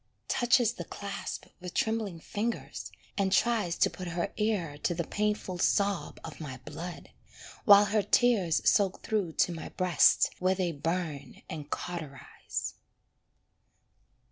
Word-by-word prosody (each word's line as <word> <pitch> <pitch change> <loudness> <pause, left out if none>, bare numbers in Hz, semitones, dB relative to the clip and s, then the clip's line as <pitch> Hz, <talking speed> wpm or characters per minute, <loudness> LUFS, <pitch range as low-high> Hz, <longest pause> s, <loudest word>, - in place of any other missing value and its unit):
Touches 240 -2 +3
the - - -6
clasp 200 -1 -6
with 180 -1 -8
trembling 220 -6 0
fingers, 220 +7 -4 0.3
and 195 -1 +2
tries 210 -4 +2
To - - +5
put 185 - -7
her 170 0 -2
ear 185 -9 -1
to 175 - 0
the 170 - -1
painful 210 -1 -2
sob 200 +1 +1
of - - -8
my 135 -4 -6
blood, 165 +4 -7 0.5
While 205 -2 +9
her 210 +1 +2
tears 205 -5 +3
soak 195 -2 +3
through 200 -7 -1
to 175 - +2
my 165 - -6
breast, 180 -5 +4
Where 185 +1 +2
they 180 -2 0
burn 155 -3 -3
and 150 -2 -7
cauterise. 160 -6 -5
185 Hz, 135 wpm, -30 LUFS, 165-210 Hz, 0.5 s, While